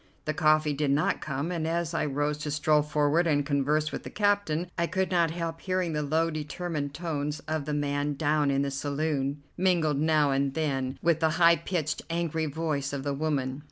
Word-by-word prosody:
The 155 - 0
coffee 155 0 +3
did 145 0 0
not 140 +2 +1
come, 140 +3 -3
and 165 -3 -2
as 170 0 -1
I 165 - 0
rose 145 +1 -1
to 150 0 -4
stroll 150 0 +3
forward 150 +3 +2
and 145 -2 +2
converse 150 +2 +1
with - - -4
the - - -8
captain 205 -5 +1
I 170 - 0
could 190 +1 -1
not 170 -2 +3
help 165 0 -4
hearing 185 -3 -1
the 150 - 0
low 160 +3 +1
determined 150 -1 -4
tones 150 -3 -3
of 155 -2 -3
the 150 - -2
man 145 0 -1
down 150 0 +1
in 140 0 +2
the 140 - -2
saloon, 140 0 -2
mingled 170 -6 +2
now 155 -2 +3
and 135 0 0
then 135 -4 -1
with 170 -2 +3
the 160 -1 +3
high 170 -1 +6
pitched, 165 -3 -2
angry 165 -2 -1
voice 145 -2 -2
of 140 -1 -3
the 140 0 -1
woman. 140 -3 -1
155 Hz, 200 wpm, -28 LUFS, 145-165 Hz, -, high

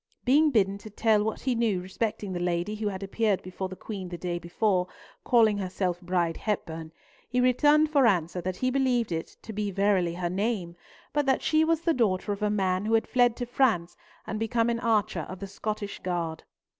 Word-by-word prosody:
Being 295 +5 +5
bidden 200 -6 +2
to 215 - -10
tell 215 0 +2
what 220 0 -3
he 255 - 0
knew 225 -5 +1
respecting 195 +1 -3
the 175 - -3
lady 175 +3 -1
who 215 0 -3
had 195 -1 -4
appeared 205 0 0
before 185 +1 -5
the 185 - -7
Queen 190 -2 -6
the 175 - -6
day 175 0 -3
before, 180 +2 0 0.4
calling 220 -4 +4
herself 180 -1 -2
Bride 175 -2 0
Hepburn, 165 -6 -3 0.4
he 250 - 0
returned 295 +5 +4
for 280 -5 +5
answer 180 -3 +1
that 185 +1 -3
he 255 +6 0
believed 250 -5 +1
it 165 -1 -4
to 220 - -7
be 210 0 -2
verily 195 -3 +1
her 175 -1 -2
name, 190 -3 -2 0.4
but 290 -1 +1
that 265 - +2
she 310 0 +3
was 325 0 +1
the 335 -1 +2
daughter 205 -6 +1
of 200 +1 -4
a 210 - +2
man 190 -2 0
who 225 - +3
had 225 - +2
fled 245 -2 +3
to 245 - -3
France, 230 -9 +1 0.3
and 215 - -4
become 230 +1 +1
an 230 - -1
archer 215 -3 0
of 185 - -6
the 200 - -6
Scottish 205 +1 -5
guard. 170 -3 -3
205 Hz, 205 wpm, -27 LUFS, 185-235 Hz, 0.4 s, Being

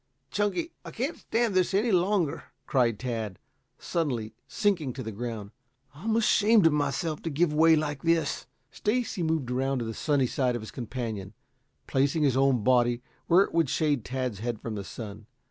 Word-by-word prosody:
"Chunky, 210 - 0
I - - -8
can't 265 +8 -3
stand 230 -2 0
this 185 +1 +2
any 220 +4 +2
longer," 180 -3 +1 0.2
cried 120 -6 +2
Tad, 110 -6 -4 0.4
suddenly 125 -10 -2
sinking 180 - 0
to 130 - -6
the 110 - -5
ground. 110 -2 -5 0.4
"I'm 215 +10 -2
ashamed 220 -2 +4
of 165 - +5
myself 150 +2 -1
to 165 - -3
give 155 +1 +1
way 160 +1 +6
like 150 -3 -2
this." 165 -3 +1 0.2
Stacy 220 -3 -1
moved 160 -6 0
around 135 +2 0
to 120 - -2
the 115 - -4
sunny 145 +2 +1
side 125 0 0
of 120 - -4
his 110 - -8
companion, 115 -5 -5 0.5
placing 140 +4 +1
his 135 -4 +3
own 135 -4 +3
body 120 0 +3 0.2
where 180 +3 +6
it - - -7
would 165 -4 +2
shade 145 -6 +1
Tad's 125 -5 -3
head 115 0 -3
from 115 - -5
the 100 -2 -4
sun. 105 +1 -8
140 Hz, 180 wpm, -28 LUFS, 120-170 Hz, 0.5 s, way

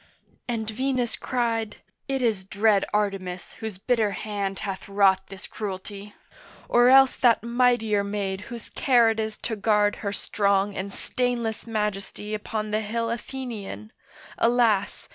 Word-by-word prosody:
And 225 -3 -2
Venus 250 +1 -1
cried, 230 -3 -1 0.3
'It 270 -2 -1
is 215 -5 +1
dread 200 +1 +2
Artemis 195 -3 -2
Whose 220 -4 -5
bitter 220 +1 +1
hand 200 -2 -3
hath 195 -1 -5
wrought 195 -1 +3
this 195 0 -9
cruelty, 200 0 -7 0.5
Or 240 +1 +5
else 270 0 +7
that 235 -3 +4
mightier 235 -3 +2
maid 200 -1 -3
whose 235 -2 -8
care 240 -4 +4
it 225 - -3
is 220 -1 -2
To 225 - -3
guard 210 0 +2
her 200 - -3
strong 200 -1 +1
and 195 +1 -4
stainless 240 -1 -2
majesty 210 -1 -3
Upon 215 0 -3
the 215 +1 +1
hill 230 +2 -2
Athenian,—alas! 230 -2 -2
215 Hz, 135 wpm, -25 LUFS, 200-235 Hz, 0.5 s, else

